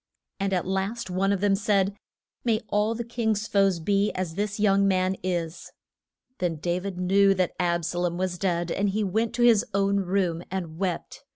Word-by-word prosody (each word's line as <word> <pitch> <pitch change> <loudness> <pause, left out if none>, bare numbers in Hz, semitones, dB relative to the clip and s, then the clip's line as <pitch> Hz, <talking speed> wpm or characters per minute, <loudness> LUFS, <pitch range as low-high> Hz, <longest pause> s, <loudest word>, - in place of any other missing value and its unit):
And 195 0 -1
at 180 -2 0
last 190 +2 -2
one 195 +2 +1
of 200 -2 0
them 205 -1 +3
said, 200 -1 +1 0.5
May 225 -2 +1
all 210 +2 +1
the 235 - -3
king's 220 -3 -1
foes 195 -3 +2
be 200 +4 +1
as 185 -3 -3
this 205 +3 -3
young 200 -1 +4
man 185 0 +1
is. 175 -2 -3 0.7
Then 175 -2 0
Da 175 +3 -1
vid 190 -1 -5
knew 195 +2 +4
that 185 -2 0
Ab 170 -2 +1
sa 175 +1 -2
lom 175 -1 -1
was 180 -1 -2
dead, 175 -3 0
and 200 +1 +1
he 210 +2 0
went 220 +4 -1
to 240 - +1
his 230 -4 +6
own 200 0 +2
room 185 -3 0
and 175 -4 -5
wept. 185 -3 -3
195 Hz, 195 wpm, -26 LUFS, 180-205 Hz, 0.7 s, his